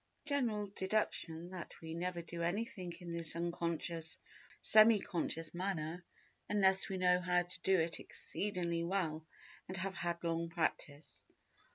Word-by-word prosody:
General 245 -8 +1
deduction 180 -4 0
that 180 -2 -7
we 160 0 -6
never 175 0 -2
do 170 0 -6
anything 185 +1 -2
in 170 -1 -5
this 165 -2 -2
unconscious 170 -1 -2
or - - -22
semi 215 0 +8
conscious 165 -4 -2
manner 175 -2 -2 0.5
unless 190 -2 +4
we 190 - -2
know 180 0 +4
how 180 -1 +3
to 175 0 -8
do 190 -1 +4
it 165 +1 0
exceedingly 175 -4 -2
well 165 -4 -1 0.4
and 185 - -5
have 190 +2 -1
had 170 -1 -2
long 165 0 0
practice. 155 -3 -2
175 Hz, 145 wpm, -36 LUFS, 165-190 Hz, 0.5 s, semi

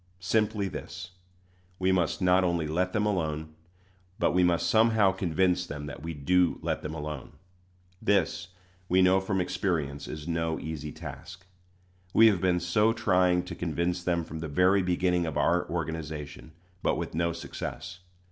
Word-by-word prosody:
Simply 105 +2 +1
this: 90 0 -7 0.7
we 95 0 +1
must 90 0 0
not 90 +1 +4
only 85 -3 0
let 90 +4 0
them 105 +1 0
alone, 80 -6 -2 0.6
but - - +2
we 90 0 +3
must 85 -1 +2
somehow 110 -3 +4
convince 90 0 0
them 75 -1 -6
that 75 - -8
we 80 0 -5
do 90 +5 +2
let - - -1
them 75 +1 -5
alone. 75 -3 -6 0.7
This, 100 -2 +1 0.4
we 95 +1 +4
know 95 +1 +4
by 95 +1 -2
experience, 85 -6 -2
is 75 +1 -7
no 80 -1 -1
easy 75 -1 -5
task. 80 +5 -9 0.7
We 115 - +8
have 95 -5 0
been 90 -1 +2
so 105 +6 +2
trying 90 -5 +2
to 90 - -7
convince 85 +2 -2
them 85 -1 0
from 80 0 -7
the 80 - -4
very 90 +6 +3
beginning 90 -1 +1
of 80 - -3
our 85 +1 +2
organization, 80 -2 -5 0.3
but - - +1
with - - -4
no 85 +2 0
success. 85 +1 -6
90 Hz, 160 wpm, -28 LUFS, 80-95 Hz, 0.7 s, We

